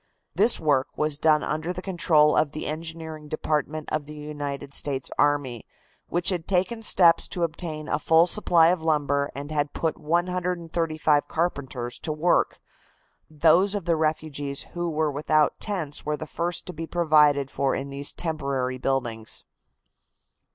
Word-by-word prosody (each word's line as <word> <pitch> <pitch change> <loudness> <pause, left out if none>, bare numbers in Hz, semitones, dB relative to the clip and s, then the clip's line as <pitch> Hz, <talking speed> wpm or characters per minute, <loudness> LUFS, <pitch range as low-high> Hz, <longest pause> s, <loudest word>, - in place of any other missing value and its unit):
This 235 - +3
work 145 -4 +2
was 150 -1 +1
done 155 -1 +3
under 155 +3 -2
the 180 0 -5
control 165 -5 +3
of 150 -2 +1
the 155 - -5
engineering 160 -1 -5
department 155 0 -2
of 150 -2 -2
the 150 - -9
United 145 -2 -6
States 135 -3 -1
army, 145 -5 +1 0.4
which 175 +1 +1
had 175 -4 -1
taken 195 +5 0
steps 175 -6 +5
to 175 - -3
obtain 155 -2 -4
a - - 0
full 160 +2 +5
supply 170 -4 +4
of 180 -1 0
lumber 145 -3 +1
and 145 +2 -6
had 145 -1 -1
put 160 -1 -2
135 170 -2 0
carpenters 135 -7 -3
to 155 - -2
work. 155 +3 +1 0.7
Those 165 +6 +3
of 200 -4 -3
the 170 -1 +2
refugees 155 -3 -1
who 175 0 -2
were 155 -1 0
without 150 +1 +1
tents 175 -9 -3
were 150 0 -2
the 155 - -6
first 170 +2 -3
to 180 - -7
be 165 +1 -6
provided 150 -5 +3
for 135 -1 0
in 140 +1 -5
these 140 +1 -3
temporary 140 -6 -2
buildings. 120 -5 -2
155 Hz, 155 wpm, -25 LUFS, 145-170 Hz, 0.7 s, steps